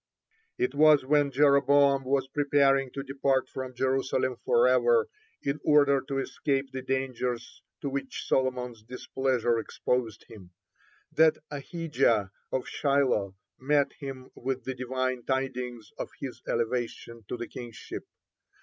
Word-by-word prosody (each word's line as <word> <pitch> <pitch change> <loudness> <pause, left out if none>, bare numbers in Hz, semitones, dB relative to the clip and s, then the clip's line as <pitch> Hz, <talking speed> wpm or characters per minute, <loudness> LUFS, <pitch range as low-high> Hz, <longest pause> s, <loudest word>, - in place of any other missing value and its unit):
(2) 365 - -1
It 375 - 0
was 150 -3 +5
when 145 +1 +3
Jeroboam 140 0 +4
was 135 0 +1
preparing 135 -1 +2
to 140 - -4
depart 135 -1 0
from 130 -1 -6
Jerusalem 130 0 0
forever, 475 -1 +4 0.4
in 140 +2 -1
order 140 -2 +4
to 135 - -2
escape 135 0 -1
the 130 0 -5
dangers 125 -2 -3 0.2
to 140 - -2
which 135 0 -4
Solomon's 125 -3 0
displeasure 125 0 -1
exposed 115 -1 -2
him, 100 -5 -13 0.7
(3) 160 - +6
that 160 - +3
Ahijah 140 - 0 0.2
of 130 - -1
Shilo 130 -9 +1 0.2
met 145 +1 +2
him 135 -3 -8
with 130 0 -3
the 130 - -3
Divine 130 0 -2
tidings 125 -4 -3
of - - -4
his - - -6
elevation 115 -1 -2
to - - -4
the 120 - -5
kingship. 120 -3 -8
130 Hz, 130 wpm, -28 LUFS, 125-140 Hz, 0.7 s, 3